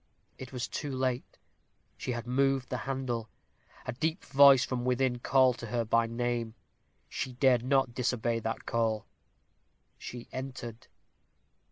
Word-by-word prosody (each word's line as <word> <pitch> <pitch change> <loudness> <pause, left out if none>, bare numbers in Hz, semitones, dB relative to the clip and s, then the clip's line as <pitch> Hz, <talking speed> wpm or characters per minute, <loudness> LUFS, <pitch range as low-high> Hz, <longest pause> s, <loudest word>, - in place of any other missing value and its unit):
It 130 -1 -8
was 125 -2 -3
too 145 - -4
late 130 -1 -2 0.6
she 125 - -3
had 120 0 -4
moved 135 +1 +1
the 125 - -2
handle. 125 -4 -2 0.6
A - - -2
deep 160 +8 -2
voice 135 -3 +7
from 125 -2 -3
within 125 0 +1
called 130 0 +3
to 120 - -6
her 115 +1 -1
by 115 +1 +3
name. 115 -1 -2 0.5
She 130 - -4
dared 125 -1 +4
not 135 -1 +2
disobey 120 -2 0
that 115 0 -4
call 110 -2 0 0.9
she 120 -1 -8
entered. 125 -3 -7
125 Hz, 140 wpm, -30 LUFS, 120-130 Hz, 0.9 s, voice